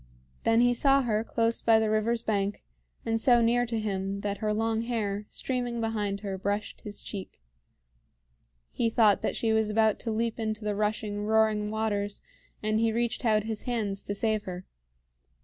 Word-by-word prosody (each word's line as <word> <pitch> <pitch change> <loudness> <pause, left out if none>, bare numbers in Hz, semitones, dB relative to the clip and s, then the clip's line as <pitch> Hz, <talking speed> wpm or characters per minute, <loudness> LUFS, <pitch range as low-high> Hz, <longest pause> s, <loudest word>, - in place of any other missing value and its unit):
Then 230 +1 +4
he 245 0 +4
saw 275 +2 +4
her 220 -2 0
close 230 0 0
by 225 -1 +5
the 220 -1 +1
river's 225 +2 +1
bank, 205 -2 -1 0.4
and 225 0 0
so 240 -1 +5
near 240 +1 +2
to 230 -1 -2
him 195 -1 -2
that 200 0 -3
her 215 -1 0
long 225 +1 0
hair, 210 -3 -2
streaming 245 -2 -3
behind 210 -3 -2
her, 195 -2 -4
brushed 205 +2 -3
his 205 -1 -8
cheek. 195 - -7 1.3
He 230 - 0
thought 220 -3 +4
that - - -1
she 225 -1 +1
was 220 -1 +2
about 220 0 +2
to 230 - -3
leap 230 +1 -1
into 215 -1 -3
the 210 - 0
rushing, 210 0 -1
roaring 215 -1 +2
waters, 205 -2 -2 0.4
and 215 0 +1
he 225 0 +2
reached 235 +2 -1
out 215 -2 +3
his 220 -1 -4
hands 210 -5 -1
to 205 - -4
save 215 0 0
her. 180 0 -6
220 Hz, 180 wpm, -28 LUFS, 205-230 Hz, 1.3 s, by